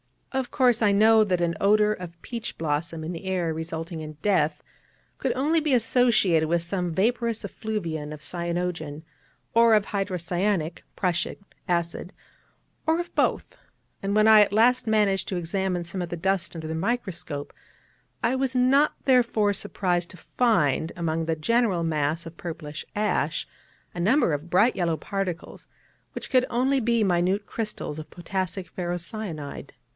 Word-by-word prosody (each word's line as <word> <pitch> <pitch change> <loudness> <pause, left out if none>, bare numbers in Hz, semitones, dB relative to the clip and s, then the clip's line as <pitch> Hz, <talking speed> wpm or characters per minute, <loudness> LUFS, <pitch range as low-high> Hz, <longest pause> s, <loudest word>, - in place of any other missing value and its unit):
Of 265 -2 -2
course, 245 -4 +3
I 205 -2 +4
know 220 +2 +6
that 180 -3 0
an 170 -1 +1
odour 210 +1 +4
of 175 -4 -6
peach 235 -1 -5
blossom 160 +1 -2
in 160 - -4
the 170 +2 -7
air, 180 -3 0
resulting 160 +1 -5
in 155 -1 -7
death, 155 -7 +1 0.6
could 260 -3 0
only 300 +5 +2
be 305 -3 0
associated 225 -9 +3
with 170 +1 +1
some 180 -1 -2
vaporous 230 +2 +1
effluvium 165 -9 -4
of 150 - -10
cyanogen, 170 -3 -3 0.5
or 230 -1 +6
of 210 -2 +2
hydrocyanic 180 -2 -1
('prussic') 175 -3 -1 0.3
acid, 170 +1 -2 0.7
or 320 +1 +3
of 350 - -5
both; - - 0 0.5
and 195 +1 -1
when 215 0 +5
I 220 -1 +9
at 200 -1 +2
last 240 +3 +4
managed 210 -3 +2
to 190 - -2
examine 180 +1 -1
some 170 +2 -4
of 175 - -4
the 175 - -4
dust 180 -1 -1
under 160 -1 -5
the 160 - -3
microscope, 165 -6 -3 0.7
I 230 +2 +2
was 265 -1 -1
not 270 +4 +4
therefore 235 -5 +3
surprised 180 -2 -1
to 185 - -13
find, 165 - +1
among 165 -1 -1
the 160 0 0
general 200 +1 +1
mass 155 0 -1
of 165 0 -10
purplish 160 -3 -6
ash, 165 -7 0 0.5
a - - -6
number 215 - +3
of 150 +4 -4
bright 205 +8 +4
yellow 170 -3 +1
particles, 190 -3 -5 0.5
which - - -7
could 255 -1 +4
only 265 +3 +2
be 235 -1 +2
minute 185 +2 +1
crystals 215 -8 -4
of 155 - -9
potassic 185 0 -4
ferrocyanide. 175 -3 -5
185 Hz, 155 wpm, -26 LUFS, 165-220 Hz, 0.7 s, I